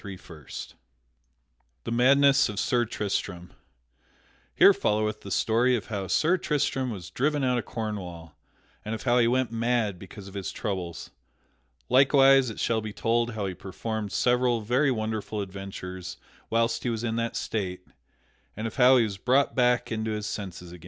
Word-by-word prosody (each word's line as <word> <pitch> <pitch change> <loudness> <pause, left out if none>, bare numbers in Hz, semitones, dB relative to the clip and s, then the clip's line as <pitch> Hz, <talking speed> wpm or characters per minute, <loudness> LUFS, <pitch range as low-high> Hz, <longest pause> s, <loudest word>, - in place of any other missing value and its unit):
PART 100 -3 -8
III 75 -5 -13 1.4
The - - -5
Madness 135 +3 +4
of 105 -1 -4
Sir 120 -1 +1
Tristram 90 -5 -4 1.1
_Here - - +8
followeth 105 0 0
the 100 - -9
story 115 +6 +2
of 110 - -5
how 100 -3 -3
Sir 170 - +2
Tristram 145 -5 -1
was 90 -6 -7
driven 145 +6 0
out 125 -1 +2
of 110 - -6
Cornwall 90 -8 -6 0.5
and 110 +1 -3
of 110 - -8
how 125 -1 +3
he 115 - +4
went 125 -1 +1
mad 115 -4 0
because 95 +1 -11
of 95 - -11
his 100 -2 -4
troubles. 90 -6 -5 0.8
Likewise 135 0 +5
it 110 - -8
shall 115 -1 +1
be 110 -1 -6
told 115 +2 0
how 105 -2 -2
he 95 - -3
performed 105 +3 -5
several 125 -1 +2
very 125 +7 +2
wonderful 110 -3 -3
adventures 95 -2 -7 0.3
whilst 115 0 +1
he 125 - -2
was 115 -1 -3
in 115 -1 -1
that 115 0 -2
state, 90 -4 -3 0.7
and 110 - -4
of 115 - -5
how 130 0 +7
he 120 - +4
was 100 -3 -4
brought 130 +6 +2
back 125 -1 +2
into 110 0 -2
his 105 -1 -3
senses 95 -4 -6
again. 90 - -11
110 Hz, 170 wpm, -27 LUFS, 100-125 Hz, 1.4 s, Here